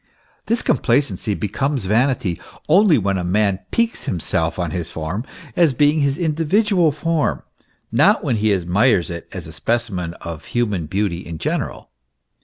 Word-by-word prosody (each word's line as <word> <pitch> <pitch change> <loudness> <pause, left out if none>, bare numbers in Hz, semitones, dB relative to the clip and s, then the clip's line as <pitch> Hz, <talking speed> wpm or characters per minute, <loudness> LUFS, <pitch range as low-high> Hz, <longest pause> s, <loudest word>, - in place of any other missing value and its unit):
This 230 +1 +1
complacency 115 -6 +1
becomes 115 - -2
vanity 110 -3 +1 0.3
only 180 0 +5
when 100 -3 0
a - - -3
man 100 +1 +1
piques 230 0 0
himself 80 -2 -1
on 85 -3 -2
his 85 -1 -3
form 80 +8 -4 0.3
as 160 -7 +3
being 150 +4 +3
his 140 0 +1
individual 170 +2 +2
form, 155 +1 -1 0.5
not - - +4
when 115 - 0
he 105 0 +2
admires 95 +2 +2
it 85 0 -7
as - - -6
a 80 - -9
specimen 90 -1 -2
of 85 -2 -8
human 105 -9 -1
beauty 95 0 -1
in 85 -2 -7
general. 60 - -3
105 Hz, 150 wpm, -20 LUFS, 90-145 Hz, 0.5 s, only